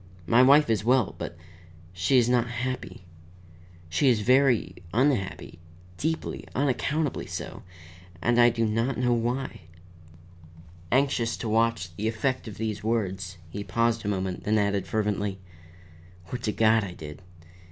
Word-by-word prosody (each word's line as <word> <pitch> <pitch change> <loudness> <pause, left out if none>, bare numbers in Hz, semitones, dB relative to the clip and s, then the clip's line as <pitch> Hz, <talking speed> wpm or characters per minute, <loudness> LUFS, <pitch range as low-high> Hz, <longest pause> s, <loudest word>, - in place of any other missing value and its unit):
My 115 +9 +5
wife 140 +3 +6
is 110 -3 +1
well, 125 -1 +3
but 85 - -6 0.6
she 90 +8 +2
is 120 -2 +4
not 120 -1 +2
happy. 120 -6 -5 0.8
She 85 - +2
is 115 -4 +3
very 125 -6 +3
unhappy, 110 -8 0 0.4
deeply, 160 +2 -3
unaccountably 145 +2 0
so, - - -6 0.6
and 120 +5 +2
I 120 - +7
do 115 -1 0
not 115 +4 0
know 125 -1 +2
why." 120 0 -2 1.3
Anxious 130 -3 +1
to 115 - -4
watch 110 -5 0
the 110 - -1
effect 125 +3 -1
of 105 - -8
these 110 -1 -3
words, 95 -5 -2
he 100 +3 -5
paused 115 +4 0
a - - -4
moment, 95 -2 -2
then 110 +1 +2
added 100 -2 0
fervently: 105 -2 -1 0.9
"Would 125 - -4
to 105 - +1
God 110 0 +3
I 95 -3 -5
did! 75 0 -9
115 Hz, 140 wpm, -27 LUFS, 100-125 Hz, 1.3 s, I